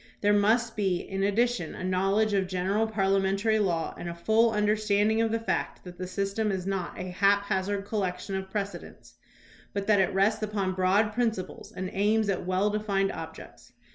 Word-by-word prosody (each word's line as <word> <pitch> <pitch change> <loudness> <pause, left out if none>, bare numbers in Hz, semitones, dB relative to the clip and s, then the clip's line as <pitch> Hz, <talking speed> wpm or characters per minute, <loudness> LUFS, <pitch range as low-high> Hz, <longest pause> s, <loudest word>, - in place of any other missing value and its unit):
There 205 0 +4
must 225 +3 +2
be 195 -4 +1
in 195 +2 -5
addition 205 -2 0
a - - -7
knowledge 195 +3 +1
of 195 -2 +1
general 190 +4 0
parliamentary 195 +1 +1
law 170 -5 0
and 175 - -6
a 170 - -6
full 220 +6 +3
understanding 210 0 +2
of 225 -1 +1
the 230 - +1
fact 225 - -2
that 180 -1 -11
the 185 - -4
system 200 +3 -1
is 185 -2 -3
not 190 -3 -3
a 185 0 -5
haphazard 200 +1 +1
collection 195 -2 -3
of 190 0 -4
precedents, 200 0 -6 0.6
but 200 -1 -2
that 210 -1 +4
it 190 - +1
rests 200 +3 +2
upon 205 -3 -1
broad 190 +4 +2
principles, 225 -5 -2
and 185 0 -5
aims 210 +2 +2
at 185 -2 -2
well 190 +3 +1
defined 200 -2 0
objects. - - -10
200 Hz, 175 wpm, -28 LUFS, 190-215 Hz, 0.6 s, There